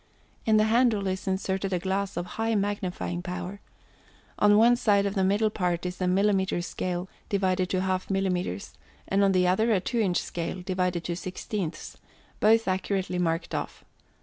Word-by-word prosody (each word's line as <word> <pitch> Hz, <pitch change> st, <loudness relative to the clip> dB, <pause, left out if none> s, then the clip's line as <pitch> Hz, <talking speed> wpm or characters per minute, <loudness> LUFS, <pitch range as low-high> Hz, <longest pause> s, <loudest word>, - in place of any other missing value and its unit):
In 215 Hz, -1 st, +5 dB
the 215 Hz, -, +5 dB
handle 220 Hz, -2 st, +3 dB
is 190 Hz, +1 st, -3 dB
inserted 190 Hz, 0 st, -1 dB
a 180 Hz, -, +1 dB
glass 190 Hz, +2 st, -2 dB
of 175 Hz, -, -2 dB
high 225 Hz, +3 st, -1 dB
magnifying 195 Hz, -3 st, -2 dB
power. 180 Hz, +2 st, -6 dB, 0.8 s
On 205 Hz, 0 st, +6 dB
one 235 Hz, +2 st, +6 dB
side 205 Hz, -4 st, +3 dB
of 200 Hz, -, -1 dB
the 195 Hz, -2 st, +1 dB
middle 205 Hz, +3 st, +2 dB
part 180 Hz, -4 st, -1 dB
is 180 Hz, +1 st, -5 dB
a -, -, +2 dB
millimètre 190 Hz, -1 st, +2 dB
scale 180 Hz, 0 st, -3 dB, 0.2 s
(divided 185 Hz, -2 st, +1 dB
to 185 Hz, -, 0 dB
half 185 Hz, 0 st, -1 dB
millimètres), 180 Hz, -, -1 dB, 0.4 s
and 195 Hz, +1 st, +2 dB
on 195 Hz, -, +4 dB
the 185 Hz, -1 st, +3 dB
other 220 Hz, +6 st, +2 dB
a 205 Hz, -, +3 dB
two 235 Hz, +6 st, -2 dB
inch 190 Hz, -5 st, +2 dB
scale 175 Hz, +2 st, -4 dB
(divided 180 Hz, -2 st, -1 dB
to 170 Hz, -, -3 dB
sixteenths), 185 Hz, -1 st, -5 dB, 0.4 s
both 225 Hz, +1 st, +4 dB
accurately 190 Hz, -1 st, -1 dB
marked 165 Hz, -1 st, -1 dB
off. -, -, -4 dB
190 Hz, 175 wpm, -27 LUFS, 180-205 Hz, 0.8 s, On